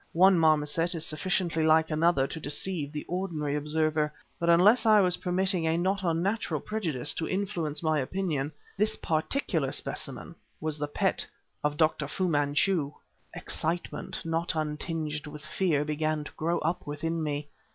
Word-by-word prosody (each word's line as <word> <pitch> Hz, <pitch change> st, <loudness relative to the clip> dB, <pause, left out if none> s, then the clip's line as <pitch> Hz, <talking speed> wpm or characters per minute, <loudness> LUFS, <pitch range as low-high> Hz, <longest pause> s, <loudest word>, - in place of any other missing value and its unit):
One 185 Hz, +1 st, +6 dB
marmoset 160 Hz, +2 st, +3 dB
is 160 Hz, -1 st, 0 dB
sufficiently 165 Hz, +1 st, 0 dB
like 160 Hz, 0 st, +4 dB
another 155 Hz, -3 st, +3 dB
to 160 Hz, -, -6 dB
deceive 150 Hz, 0 st, -1 dB
the 150 Hz, -1 st, -5 dB
ordinary 165 Hz, -6 st, -2 dB
observer, 150 Hz, 0 st, +1 dB, 0.3 s
but 170 Hz, -, 0 dB
unless 200 Hz, +8 st, +6 dB
I 215 Hz, -2 st, +6 dB
was 180 Hz, -2 st, +3 dB
permitting 180 Hz, -1 st, 0 dB
a 160 Hz, +1 st, +2 dB
not 190 Hz, +3 st, 0 dB
unnatural 185 Hz, +5 st, 0 dB
prejudice 160 Hz, -, 0 dB
to 160 Hz, -, -3 dB
influence 180 Hz, -6 st, -2 dB
my 155 Hz, -1 st, +2 dB
opinion, 150 Hz, -1 st, -2 dB, 0.2 s
this 210 Hz, +2 st, +1 dB
particular 165 Hz, -, -1 dB
specimen -, -, -2 dB, 0.3 s
was 155 Hz, -1 st, -2 dB
the 145 Hz, -, -1 dB
pet 145 Hz, -, 0 dB, 0.4 s
of 150 Hz, 0 st, 0 dB
Dr. 155 Hz, -2 st, +2 dB
Fu 185 Hz, +5 st, -1 dB
Manchu! 145 Hz, +1 st, +1 dB, 0.4 s
Excitement, 165 Hz, +1 st, -2 dB
not 165 Hz, +1 st, -1 dB
untinged 155 Hz, 0 st, -3 dB
with 150 Hz, 0 st, -9 dB
fear, 155 Hz, -2 st, 0 dB
began 155 Hz, 0 st, -1 dB
to -, -, -9 dB
grow 170 Hz, +2 st, -1 dB
up 165 Hz, +1 st, -2 dB
within 165 Hz, +3 st, -2 dB
me. 145 Hz, -1 st, -3 dB
160 Hz, 150 wpm, -28 LUFS, 150-180 Hz, 0.4 s, One